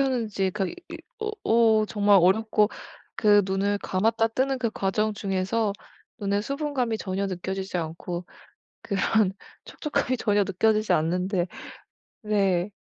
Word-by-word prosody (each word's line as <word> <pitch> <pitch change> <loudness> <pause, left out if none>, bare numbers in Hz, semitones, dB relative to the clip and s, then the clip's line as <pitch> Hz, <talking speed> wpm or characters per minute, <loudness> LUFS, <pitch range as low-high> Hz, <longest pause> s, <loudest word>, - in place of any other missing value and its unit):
하는지 225 -8 0
그 195 0 -2
이 - - -7 0.2
이 - - -6 0.2
어 430 0 -1
어 220 -2 +4
정말 205 -2 +4
어렵고 210 +3 +3 0.5
그 205 -1 +5
눈을 200 +1 0
감았다 225 +5 +1
뜨는 260 +3 0
그 235 -3 -1
과정 210 +1 -1
중에서 200 +2 -1 0.5
눈의 200 0 0
수분감이 275 -4 -2
전혀 195 +1 -2
느껴지지 190 +1 -4
않고 170 +2 -5 0.6
그런 200 -1 +1 0.3
촉촉함이 280 -4 -2
전혀 205 -2 +2
느껴지지 215 +3 +1
않는데 180 +3 0 0.8
네. 200 -3 +1
205 Hz, 265 characters per minute, -26 LUFS, 190-225 Hz, 0.8 s, 그